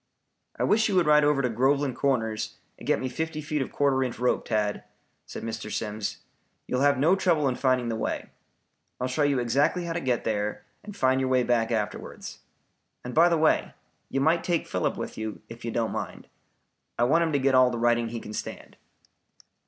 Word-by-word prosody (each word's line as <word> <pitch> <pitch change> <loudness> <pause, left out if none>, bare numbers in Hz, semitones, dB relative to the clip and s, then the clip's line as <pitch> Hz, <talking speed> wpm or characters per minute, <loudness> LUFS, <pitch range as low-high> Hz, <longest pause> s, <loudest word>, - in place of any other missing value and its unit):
"I - - -1
wish 220 +1 +3
you 200 - 0
would 180 -2 +4
ride 150 0 +5
over 145 -2 +2
to 125 - +1
Groveland 135 +3 +1
Corners 115 -6 -1 0.2
and - - -10
get - - +2
me 130 - -2
fifty 160 +4 -3
feet 150 -1 -2
of 135 - -4
quarter 135 -2 +2
inch 125 -2 -4
rope, 125 +1 0
Tad," 105 -2 -1 0.4
said - - -7
Mr. 110 -1 -5
Simms. 105 0 -3 0.4
"You 125 - -2
will - - 0
have 140 0 +4
no 160 +8 +4
trouble 170 -6 +2
in 130 - +1
finding 130 -2 +1
the 115 - -1
way. 110 - -3 0.7
I'll 125 - -1
show 130 +4 -1
you 145 -2 +3
exactly 145 +9 +1
how 170 - -3
to 170 - -1
get 125 -5 -1
there 105 -1 -2 0.2
and 205 -1 -9
find 130 0 +2
your 130 - 0
way 130 -1 +3
back 115 -2 +1
afterwards. 105 -3 -4 0.7
And 125 - -5
by 170 +2 +6
the 170 - +2
way, 155 0 +2 0.3
you 135 - -1
might 160 +4 +2
take 170 -2 0
Philip - - -1
with - - -6
you, 110 -1 -5
if 115 +1 -10
you 115 - -3
don't 115 -1 -1
mind. - - -6 0.7
I 120 - +2
want 155 +7 +4
him 160 -2 -1
to - - +4
get 135 0 +2
all 130 -1 +6
the 120 - -3
riding 120 0 +2
he 115 0 -5
can 105 - -9
stand." - - -7
130 Hz, 215 wpm, -27 LUFS, 115-150 Hz, 0.7 s, by